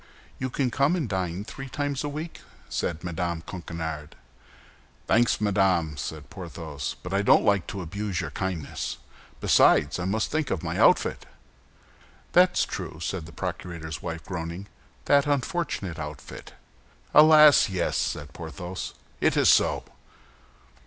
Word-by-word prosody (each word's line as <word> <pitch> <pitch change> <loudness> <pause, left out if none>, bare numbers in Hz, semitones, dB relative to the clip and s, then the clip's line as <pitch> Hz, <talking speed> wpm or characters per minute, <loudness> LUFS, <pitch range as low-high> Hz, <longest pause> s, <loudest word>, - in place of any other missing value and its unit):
"You 130 - -2
can 125 0 -1
come 140 +7 +2
and 160 -8 -1
dine 95 -1 -2
three 135 +5 -8
times 145 0 -2
a 145 - -2
week," 155 +3 -6 0.3
said 80 -2 -2
Mme. 85 -1 -2
Coquenard. 80 -3 -6 0.9
"Thanks, 115 +1 +3
madame!" 95 -6 +2
said 75 +2 -6
Porthos, 80 -6 -6
"but 90 - -5
I 100 - +2
don't 100 - +5
like 100 -3 +2
to 95 -2 -5
abuse 100 +2 -3
your - - -3
kindness; 95 -5 -4 0.4
besides, 75 +4 +4
I 90 - -2
must 105 +4 -1
think 155 -1 0
of 85 - -2
my - - -3
outfit!" - - +3 1.0
"That's 180 0 +4
true," - - -6
said 85 -1 -4
the - - -11
procurator's 80 -1 -5
wife, 80 0 -5
groaning, 85 +1 -5 0.4
"that 140 0 +4
unfortunate 145 - -1
outfit!" 75 -2 -8 0.6
"Alas, 150 -3 +8
yes," 90 -3 -1
said 70 0 -2
Porthos, 90 +2 -6 0.2
"it - - +2
is - - +5
so." - - +4
95 Hz, 140 wpm, -26 LUFS, 80-130 Hz, 1.0 s, Alas